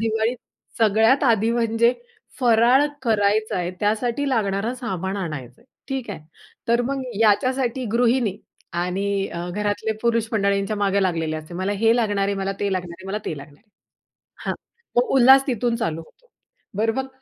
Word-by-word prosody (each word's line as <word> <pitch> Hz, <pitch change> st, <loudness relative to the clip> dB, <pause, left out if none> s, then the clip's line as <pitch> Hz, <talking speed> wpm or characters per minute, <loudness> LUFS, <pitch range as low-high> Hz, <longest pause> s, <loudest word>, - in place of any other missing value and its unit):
दिवाळी 225 Hz, +1 st, 0 dB, 0.4 s
सगळ्यात 225 Hz, +5 st, +4 dB
आधी, 225 Hz, -3 st, +3 dB
म्हणजे 235 Hz, 0 st, +2 dB, 0.5 s
फराळ 245 Hz, +3 st, +5 dB, 0.2 s
करायचाय, 210 Hz, -5 st, +1 dB
त्यासाठी 235 Hz, +6 st, 0 dB
लागणारं 215 Hz, -1 st, 0 dB
सामान 190 Hz, -6 st, -4 dB
आणायचंय, 150 Hz, -, -6 dB, 0.2 s
ठीक 265 Hz, -5 st, -3 dB
आहे. 190 Hz, -, -6 dB, 0.5 s
तर 235 Hz, +1 st, +3 dB
मग 270 Hz, +2 st, -2 dB, 0.2 s
याच्यासाठी 255 Hz, +3 st, +2 dB
गृहिणी 235 Hz, -4 st, +2 dB, 0.5 s
आणि 195 Hz, +2 st, -1 dB, 0.2 s
घरातले 205 Hz, +3 st, -1 dB
पुरुष 230 Hz, -1 st, +1 dB
मंडळींच्या 200 Hz, 0 st, +1 dB
मागे 200 Hz, -1 st, +1 dB
लागलेले 165 Hz, -4 st, -1 dB
असते. 155 Hz, +2 st, -9 dB
"मला 190 Hz, +3 st, -1 dB
हे 225 Hz, +3 st, +3 dB
लागणार 205 Hz, -4 st, +1 dB
आहे, 200 Hz, -, -1 dB
मला 195 Hz, 0 st, -2 dB
ते 200 Hz, -1 st, 0 dB
लागणार 180 Hz, -2 st, -3 dB
आहे, 190 Hz, -, -11 dB
मला 200 Hz, +2 st, -2 dB
ते 155 Hz, -, -3 dB
लागणार 145 Hz, +1 st, -12 dB
आहे." 210 Hz, -, -41 dB, 0.8 s
हां. -, -, 0 dB, 0.4 s
तो 245 Hz, +1 st, +4 dB
उल्हास 265 Hz, +1 st, +7 dB
तिथून 240 Hz, -2 st, 0 dB
चालू 165 Hz, -8 st, -2 dB
होतो. -, -, -19 dB, 0.5 s
बरं 225 Hz, +1 st, +1 dB
मग 265 Hz, +1 st, -3 dB
220 Hz, 150 wpm, -22 LUFS, 195-240 Hz, 0.8 s, उल्हास